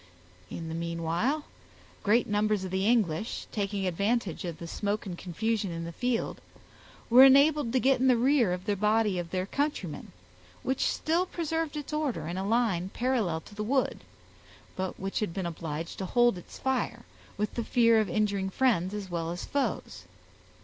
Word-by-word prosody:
In 165 - -6
the 160 - -5
meanwhile, 170 - -1 0.6
great 225 +4 +3
numbers 210 -1 +1
of 185 - -5
the 190 +2 0
English, 215 -4 +1
taking 200 -2 -2
advantage 200 +1 -1
of 170 -2 -5
the 170 - -8
smoke 205 +5 -2
and 185 -3 -5
confusion 205 +4 -2
in 165 -1 -4
the 170 - -5
field, 245 +5 -2 0.7
were 250 +3 +8
enabled 280 -1 +6
to 260 - +2
get 265 0 +3
in 260 - +3
the 250 -2 +5
rear 250 -4 +3
of 180 +1 -3
the 205 -1 +1
body 210 -1 +2
of 170 -1 -5
their 185 +1 -1
countrymen, 240 - -3 0.5
which 265 0 +1
still 340 +4 0
preserved 325 -2 -2
its 295 0 -6
order 270 - -1
in 175 +3 -3
a 195 - -2
line 210 -6 +1
parallel 225 -10 0
to - - -15
the 210 +1 -4
wood, 260 +4 0 0.8
but 185 0 -4
which 195 +1 -2
had 205 -6 -2
been 190 -2 -2
obliged 165 -1 -5
to 190 - -3
hold 240 +1 +4
its 175 - -11
fire, 265 -1 -2 0.3
from 210 - +1
the 235 - -2
fear 230 -1 +4
of 215 -3 0
injuring 200 0 0
friends 205 -4 +1
as 205 -2 -5
well 165 -1 -2
as 175 +1 -4
foes. 280 -1 -2
210 Hz, 180 wpm, -29 LUFS, 180-245 Hz, 0.8 s, were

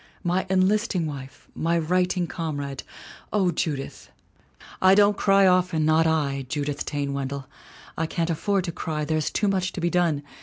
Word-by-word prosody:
My 180 +2 0
enlisting 190 -1 +2
wife, 135 -3 -8
my 170 +1 0
righting 180 +2 +1
comrade! 145 -5 -4 0.5
O 190 -4 +2
Judith!' 150 -4 -4 0.4
' - - -37 0.3
"I 190 +1 +6
don't 205 0 +5
cry 195 0 +4
often 180 -4 +3
not 160 +1 +4
I, 140 -4 0
Judith 145 0 -2
Taine 140 -1 -2
Wendell. 140 0 -4 0.5
I 160 - -1
can't 170 +1 -1
afford 195 +4 0
to 170 - -3
cry, 155 -2 -3
there's 155 -1 0
too 210 - 0
much 185 -2 0
to - - -5
be 170 0 0
done. 170 -5 +1
165 Hz, 165 wpm, -25 LUFS, 145-185 Hz, 0.5 s, I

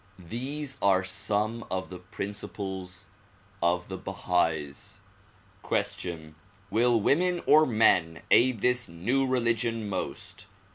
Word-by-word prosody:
These 135 +3 -4
are 95 -1 +4
some 105 +4 -1
of 95 0 -3
the 90 - -7
principles 95 -1 -6 0.6
of 85 +1 +1
the 95 -1 -6
Bahais. 80 -7 -1 0.6
Question: 80 -3 -2 0.4
Will 120 +1 +3
women 175 - +2
or 155 +1 +6
men 90 -8 +3
aid 120 -3 +4
this 125 -2 +1
new 120 +12 0
religion 115 -3 +1
most? 95 -2 -5
105 Hz, 105 wpm, -28 LUFS, 90-125 Hz, 0.6 s, or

